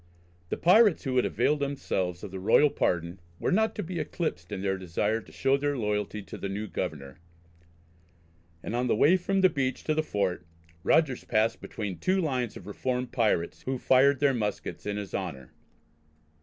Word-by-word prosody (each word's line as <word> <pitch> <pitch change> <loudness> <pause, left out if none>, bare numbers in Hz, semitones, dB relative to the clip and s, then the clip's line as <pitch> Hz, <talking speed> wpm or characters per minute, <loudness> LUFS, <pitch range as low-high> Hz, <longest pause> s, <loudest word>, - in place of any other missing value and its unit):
The - - -2
pirates 205 +1 +5
who 130 -3 -1
had 125 - +4
availed 150 0 +1
themselves 95 -11 -2
of 100 - -7
the 95 - -6
royal 115 +9 +4
pardon, 85 +1 -1 0.2
were - - 0
not 220 +3 +2
to 210 - -3
be 175 0 -4
eclipsed 90 - -3
in 95 -2 -4
their 95 -1 +1
desire 95 +5 -1
to - - -17
show 135 +1 +2
their 145 0 -1
loyalty 105 -2 -2
to - - -9
the 100 - -4
new 100 +2 -3
governor, 70 -9 -5 1.4
and 115 - -3
on 125 +1 0
the - - +2
way 150 +11 +5
from 190 +1 0
the 190 - +7
beach 135 -5 -2
to 155 - +1
the 155 - +1
Fort, 100 - -1 0.4
Rogers 145 -6 +2
passed 110 +1 +1
between 100 -5 -5
two 190 +1 +1
lines 130 - -1
of - - -12
reformed 125 +4 -3
pirates, 105 -8 0
who 130 0 -2
fired 130 +2 +4
their 145 -2 +3
muskets 105 -3 -3
in 105 0 -2
his 100 -2 -6
honour. 75 -10 -5
120 Hz, 185 wpm, -28 LUFS, 100-145 Hz, 1.4 s, the